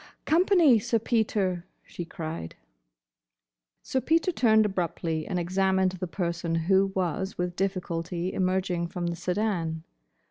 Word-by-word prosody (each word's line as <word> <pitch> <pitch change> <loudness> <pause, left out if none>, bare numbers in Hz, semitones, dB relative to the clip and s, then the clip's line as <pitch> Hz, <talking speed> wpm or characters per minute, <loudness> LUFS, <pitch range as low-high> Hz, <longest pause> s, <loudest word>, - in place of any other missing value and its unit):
"Company, 330 - +5
Sir 230 +2 +1
Peter!" 205 -6 0 0.2
she 175 - -7
cried. 160 - -6 1.3
Sir 260 - -1
Peter 330 +5 +2
turned 220 -8 +4
abruptly 170 -4 -2
and 185 - -2
examined 190 +1 +1
the 185 0 -5
person 170 -2 -2
who 190 +4 +3
was 190 +1 -2
with 180 0 -2
difficulty 180 -2 -2
emerging 185 -2 0
from 175 +1 -4
the 170 0 -1
sedan. 175 -4 -1
185 Hz, 120 wpm, -27 LUFS, 170-205 Hz, 1.3 s, Company